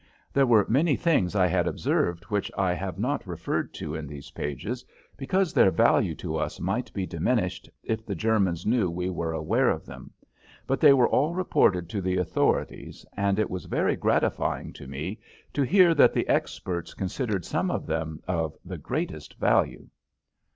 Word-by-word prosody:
There 135 Hz, -1 st, +4 dB
were 110 Hz, -4 st, +5 dB
many 145 Hz, +6 st, +3 dB
things 125 Hz, -, +1 dB
I 95 Hz, -2 st, +4 dB
had 90 Hz, -, +1 dB
observed 85 Hz, 0 st, 0 dB
which 105 Hz, -2 st, -2 dB
I 95 Hz, -2 st, +2 dB
have 95 Hz, 0 st, -4 dB
not -, -, -2 dB
referred -, -, -3 dB
to 75 Hz, -, -5 dB
in 80 Hz, -2 st, -5 dB
these 70 Hz, 0 st, -10 dB
pages 85 Hz, -, -4 dB, 0.3 s
because 185 Hz, +5 st, 0 dB
their -, -, +6 dB
value 85 Hz, -, +3 dB
to -, -, -4 dB
us -, -, -3 dB
might 110 Hz, +8 st, -2 dB
be 95 Hz, -2 st, -3 dB
diminished 90 Hz, +3 st, -1 dB
if 110 Hz, 0 st, -2 dB
the 100 Hz, -3 st, -4 dB
Germans 95 Hz, -4 st, +1 dB
knew 110 Hz, -4 st, +2 dB
we 90 Hz, +2 st, -3 dB
were 85 Hz, -2 st, -2 dB
aware 80 Hz, -1 st, +1 dB
of -, -, -2 dB
them, -, -, -11 dB, 0.5 s
but 135 Hz, -, 0 dB
they 150 Hz, -3 st, +8 dB
were 130 Hz, -3 st, +5 dB
all 155 Hz, +6 st, +1 dB
reported 95 Hz, -, +2 dB
to 100 Hz, -, -3 dB
the 95 Hz, 0 st, 0 dB
authorities, 90 Hz, -2 st, -1 dB
and 100 Hz, -1 st, +1 dB
it 110 Hz, -, 0 dB
was 90 Hz, -, -5 dB
very -, -, +1 dB
gratifying -, -, 0 dB
to 70 Hz, -, -11 dB
me 75 Hz, -, -5 dB, 0.3 s
to 145 Hz, -, 0 dB
hear 175 Hz, +5 st, +5 dB
that 145 Hz, -, +5 dB
the -, -, 0 dB
experts 85 Hz, -3 st, -2 dB
considered 100 Hz, 0 st, -2 dB
some 175 Hz, +5 st, -1 dB
of -, -, -2 dB
them 80 Hz, -1 st, -3 dB
of 80 Hz, -4 st, -2 dB
the -, -, -6 dB
greatest -, -, -4 dB
value. -, -, +1 dB
95 Hz, 180 wpm, -26 LUFS, 85-125 Hz, 0.5 s, they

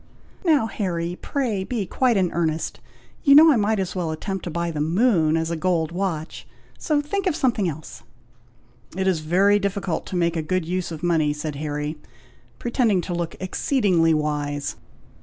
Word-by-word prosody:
"Now, 310 Hz, -9 st, +3 dB
Harry, 175 Hz, -5 st, -3 dB
pray 235 Hz, -9 st, -1 dB
be 215 Hz, -1 st, -2 dB
quite 240 Hz, +4 st, +1 dB
in 185 Hz, -3 st, +1 dB
earnest. 160 Hz, -2 st, -1 dB, 0.4 s
You 280 Hz, -2 st, +7 dB
know 315 Hz, +2 st, +9 dB
I -, -, +4 dB
might 215 Hz, 0 st, +1 dB
as 185 Hz, -1 st, -3 dB
well 175 Hz, -3 st, -1 dB
attempt 190 Hz, +4 st, -4 dB
to -, -, -3 dB
buy 170 Hz, +1 st, -2 dB
the 150 Hz, -2 st, -3 dB
moon 165 Hz, -2 st, +3 dB
as 165 Hz, +1 st, -1 dB
a -, -, 0 dB
gold 165 Hz, -1 st, 0 dB
watch; 170 Hz, -3 st, -4 dB, 0.3 s
so 300 Hz, -2 st, +1 dB
think 385 Hz, +7 st, -2 dB
of 345 Hz, -, +1 dB
something 235 Hz, -, +1 dB
else." 155 Hz, 0 st, -8 dB, 1.0 s
"It 190 Hz, -, 0 dB
is 185 Hz, -4 st, +2 dB
very 190 Hz, +6 st, +3 dB
difficult 200 Hz, -3 st, -2 dB
to -, -, -5 dB
make 170 Hz, -1 st, +1 dB
a 165 Hz, -, 0 dB
good 180 Hz, +2 st, -1 dB
use 180 Hz, +1 st, -2 dB
of 160 Hz, 0 st, -7 dB
money," 160 Hz, -4 st, +2 dB
said 150 Hz, -1 st, -5 dB
Harry, 150 Hz, +1 st, -3 dB, 0.6 s
pretending 235 Hz, -6 st, +1 dB
to 175 Hz, -, -5 dB
look 170 Hz, -1 st, -3 dB
exceedingly 185 Hz, -, +2 dB
wise. 145 Hz, -1 st, -2 dB
175 Hz, 175 wpm, -23 LUFS, 160-205 Hz, 1.0 s, know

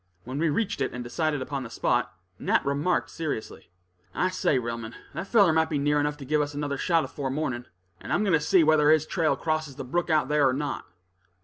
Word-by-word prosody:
When 130 Hz, +4 st, -5 dB
we 165 Hz, 0 st, +2 dB
reached 205 Hz, +7 st, -1 dB
it, -, -, -1 dB
and 125 Hz, 0 st, -5 dB
decided 145 Hz, +2 st, -1 dB
upon 140 Hz, 0 st, -4 dB
the 125 Hz, -, -7 dB
spot, 115 Hz, -, 0 dB, 0.3 s
Nat -, -, +1 dB
remarked 145 Hz, +6 st, 0 dB
seriously: 155 Hz, -9 st, -5 dB, 0.5 s
"I 185 Hz, -, +1 dB
say, 185 Hz, -6 st, +1 dB
Relmond, 115 Hz, -1 st, -4 dB, 0.2 s
that -, -, -5 dB
feller 200 Hz, -8 st, +5 dB
might 160 Hz, 0 st, +2 dB
be 150 Hz, -, 0 dB
near 145 Hz, +1 st, +2 dB
enough 145 Hz, 0 st, -1 dB
to 140 Hz, -, -9 dB
give 150 Hz, +2 st, +2 dB
us 145 Hz, 0 st, -3 dB
another 145 Hz, -1 st, -2 dB
shot 165 Hz, +3 st, +2 dB
afore 140 Hz, -2 st, -4 dB
morning, 130 Hz, -4 st, -2 dB, 0.3 s
and -, -, -8 dB
I'm -, -, +2 dB
going 195 Hz, -4 st, +1 dB
to 160 Hz, -, +5 dB
see 165 Hz, +3 st, +4 dB
whether 155 Hz, -1 st, +4 dB
his 155 Hz, -1 st, +4 dB
trail 160 Hz, -1 st, +1 dB
crosses 155 Hz, -3 st, -2 dB
the 135 Hz, -, -6 dB
brook 175 Hz, +7 st, -1 dB
out 155 Hz, -3 st, +3 dB
there 150 Hz, -2 st, +3 dB
or -, -, 0 dB
not." 145 Hz, +1 st, -3 dB
150 Hz, 225 wpm, -26 LUFS, 135-160 Hz, 0.5 s, feller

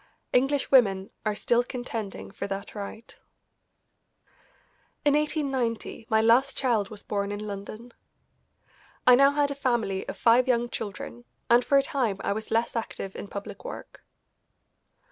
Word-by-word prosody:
English 270 Hz, +3 st, +2 dB
women 195 Hz, -7 st, +4 dB, 0.2 s
are 210 Hz, -, 0 dB
still 240 Hz, +3 st, +2 dB
contending 240 Hz, -5 st, -6 dB
for 200 Hz, -, -5 dB
that 195 Hz, 0 st, -5 dB
right. 210 Hz, +2 st, -8 dB, 1.9 s
In 290 Hz, -, +5 dB
1890 270 Hz, -7 st, -1 dB
my 220 Hz, -, +4 dB
last 245 Hz, +5 st, +4 dB
child 230 Hz, -7 st, +1 dB
was 210 Hz, -2 st, -9 dB
born 200 Hz, -1 st, -2 dB
in 205 Hz, +1 st, -4 dB
London. 210 Hz, +4 st, -7 dB, 1.1 s
I 250 Hz, -, +8 dB
now 275 Hz, +3 st, +7 dB
had 285 Hz, 0 st, +1 dB
a -, -, 0 dB
family 235 Hz, -8 st, -1 dB
of -, -, -5 dB
five 240 Hz, +2 st, +4 dB
young 240 Hz, -1 st, +2 dB
children, 185 Hz, -, -6 dB, 0.3 s
and 240 Hz, +1 st, +6 dB
for 280 Hz, -, +3 dB
a 275 Hz, -, +4 dB
time 245 Hz, -8 st, -1 dB
I -, -, 0 dB
was 220 Hz, +1 st, -6 dB
less 230 Hz, +2 st, 0 dB
active 195 Hz, -4 st, -4 dB
in -, -, -6 dB
public 200 Hz, 0 st, -7 dB
work. -, -, -9 dB
230 Hz, 145 wpm, -27 LUFS, 205-260 Hz, 1.9 s, I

